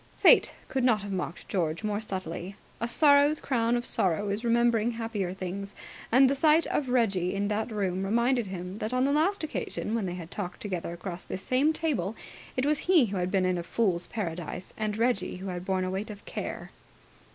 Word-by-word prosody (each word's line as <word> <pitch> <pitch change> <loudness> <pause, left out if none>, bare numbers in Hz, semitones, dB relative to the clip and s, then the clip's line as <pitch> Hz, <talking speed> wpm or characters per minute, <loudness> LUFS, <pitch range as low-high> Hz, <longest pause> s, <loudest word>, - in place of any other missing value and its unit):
Fate - - +6 0.2
could 265 -1 -1
not 225 -5 +3
have 205 - -5
mocked 180 -3 -4
George 165 -1 -1
more 210 0 -1
subtly. 190 -2 -5 0.2
A 230 - -1
sorrow's 285 +3 +5
crown 240 -2 +1
of 240 - -3
sorrow 190 +3 +1
is 205 +3 -2
remembering 235 -1 +3
happier 225 -5 -3
things, 190 +2 -5 0.4
and 260 +3 +7
the 270 - +2
sight 310 +3 +4
of 270 -4 -1
Reggie 200 -7 +1
in 200 +1 0
that 215 +3 -1
room 195 -4 -1
reminded 235 +3 +2
him 185 +1 -6
that 220 +4 -2
on 255 - +2
the 280 - +2
last 325 +6 +2
occasion 300 -7 -3
when 225 -4 0
they 175 - -4
had 170 -1 -8
talked 185 -4 -5
together 180 -5 -4
across 175 +1 -6
this 190 - -6
same 270 +5 +3
table 280 - -1 0.4
it 255 - +1
was 295 0 +2
he 340 -9 +6
who 200 -3 -3
had 180 0 0
been 190 -1 +2
in 185 -1 +1
a - - -4
Fool's 175 -2 0
Paradise 180 -3 -5
and 215 -1 -2
Reggie 230 -5 0
who 190 +1 -6
had 180 0 -5
borne 190 -1 0
a 185 - -2
weight 195 +3 -3
of 205 -1 -9
care. - - -5
210 Hz, 210 wpm, -28 LUFS, 185-240 Hz, 0.4 s, and